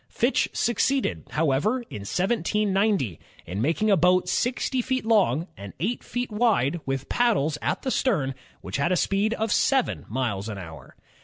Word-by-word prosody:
Fitch - - +1
succeeded, 265 +3 0
however, 165 - +1
in 165 - -8
1790, 195 - 0 0.3
in 95 +5 -4
making 170 - +1
a - - +6
boat 180 +1 +3
sixty 250 +5 0
feet 260 -1 -2
long 185 - +3
and 100 -1 -9
eight 225 +8 -2
feet 245 -1 -4
wide 210 - +2
with 135 0 -2
paddles 160 - +1
at - - -2
the 260 - -1
stern, 160 - +1 0.3
which 95 - -4
had 140 +5 +1
a 180 - +3
speed 205 +6 +1
of 220 -1 -2
seven 265 +2 +1
miles 110 -4 -2
an 105 - -5
hour. 85 -4 -10
185 Hz, 160 wpm, -25 LUFS, -, 0.3 s, a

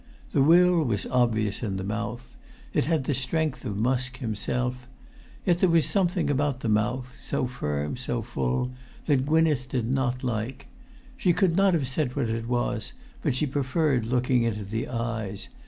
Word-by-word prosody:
The - - +3
will 175 +3 +6
was 110 -7 -1
obvious 115 -5 +1
in 100 -5 -2
the 95 - -3
mouth. 115 +4 -4 0.4
It - - +2
had 160 -2 +1
the 145 - 0
strength 150 +3 0
of 105 -4 -3
Musk 130 +3 0
himself. 125 +2 -2 0.6
Yet 175 -3 +3
there 185 - +4
was 165 -3 +4
something 175 +2 +1
about 145 -2 0
the 115 - -1
mouth—so 125 +4 -1
firm—so 120 - -3
full—that 125 - -2
Gwynneth 155 -5 +2
did 120 -3 -1
not 130 0 0
like. 120 +1 -3 0.5
She 180 -9 +3
could 175 -2 +2
not 195 -1 +4
have 140 -5 0
said 130 -1 -1
what 135 -6 0
it 115 0 -2
was, 120 -2 -1 0.3
but 145 -6 0
she 140 - +1
preferred 135 -2 0
looking 125 0 +2
into 105 -3 -1
the 110 +4 -3
eyes. 115 -4 -3
125 Hz, 160 wpm, -26 LUFS, 115-145 Hz, 0.6 s, will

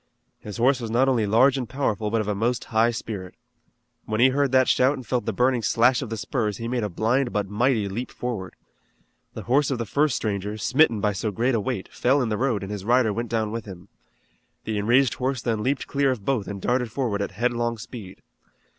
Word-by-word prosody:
His 105 -2 -8
horse 130 +3 +3
was 115 - -4
not 125 +4 +2
only 120 -5 +2
large 130 +6 +4
and 125 - -5
powerful 110 -6 -1
but 115 +1 +1
of 105 - -5
a 105 - 0
most 115 +4 -1
high 110 +2 +4
spirit. 105 -5 -6 0.7
When 110 0 -2
he 130 +2 +6
heard 140 0 +1
that 130 -1 +4
shout 130 +3 +3
and 130 -3 -9
felt 125 +2 -2
the - - +1
burning 125 +3 +1
slash 120 +4 +3
of 130 - -5
the 115 - -4
spurs 110 -2 -2
he 115 - -5
made 120 0 -1
a 105 - -1
blind 120 +7 0
but 105 -1 -1
mighty 110 +1 +1
leap 115 +6 -4
forward. 110 -8 -5 0.8
The - - -6
horse 135 +4 +2
of 135 - -1
the 115 - -3
first 145 +4 +1
stranger, 105 0 -3
smitten 115 -1 +3
by 105 0 +1
so 105 +3 -2
great 120 +6 0
a 115 - +2
weight, 100 -1 -3
fell 130 +3 +2
in 115 - -2
the 105 - -1
road 120 -6 0
and 95 - -6
his 100 -2 -5
rider 120 0 +3
went 115 +2 -3
down 110 -2 -1
with 115 +1 -5
him. 90 -4 -11 0.7
The 110 -1 -2
enraged 120 +4 +3
horse 130 0 -2
then 115 -3 -1
leaped 135 +4 -1
clear 140 -1 +1
of 120 -7 -3
both 125 -7 0
and 100 -1 -5
darted 125 +2 0
forward 115 -5 -1
at 100 - -3
headlong 120 +2 -1
speed. 105 -4 -10
115 Hz, 230 wpm, -24 LUFS, 105-130 Hz, 0.8 s, he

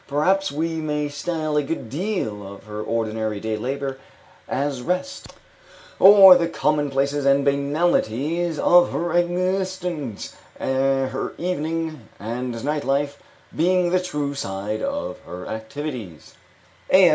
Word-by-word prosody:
Perhaps 190 +7 +1
we 160 +3 -2
may 150 -2 -2
style 155 +1 -3
a - - +4
good 140 -3 -4
deal 150 - -3
of 100 - -12
her 105 0 -6
ordinary 110 -1 -2
day 110 +1 -2
labor 135 +4 -3 0.5
as 140 -1 -1
rest, 180 - -3 0.7
or 195 -1 +10
the 170 -1 +2
commonplaces 145 -2 0
and 140 0 +3
banalities 150 +2 +1
of 175 +3 +5
her 170 0 -1
existence, 180 - -1 0.2
her 135 0 0
evening 160 - -3
and 120 +2 -4
night 150 0 -1
life 140 +1 -1 0.3
being 180 +1 +2
the 185 0 +3
true 150 -5 -3
side 100 -4 -4
of 280 +1 -3
her 90 +1 -9
activities" 110 - -6 0.6
(A. 185 -2 +7
145 Hz, 120 wpm, -23 LUFS, 130-175 Hz, 0.7 s, or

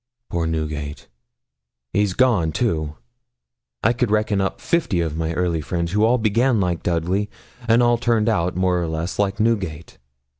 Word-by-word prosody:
Poor 85 -1 -1
Newgate, 75 -2 -4 0.9
he's 100 -3 +1
gone, 110 -11 +3
too! 80 -6 -1 0.9
I 115 - +4
could 120 -1 0
reckon 105 -1 +1
up 95 - -2
fifty 165 - 0
of 80 -3 -1
my 80 0 -2
early 85 -2 0
friends 85 +2 -2
who 105 +2 +2
all 120 +3 +3
began 115 +2 +2
like 90 -3 0
Dudley, 90 +4 0 0.4
and 115 +2 +5
all 120 -1 +3
turned 115 -3 +1
out, 90 -6 +1
more 90 -1 +1
or 85 - -2
less, 80 +4 -4
like 100 0 0
Newgate.' 100 -8 -1
95 Hz, 160 wpm, -22 LUFS, 85-110 Hz, 0.9 s, and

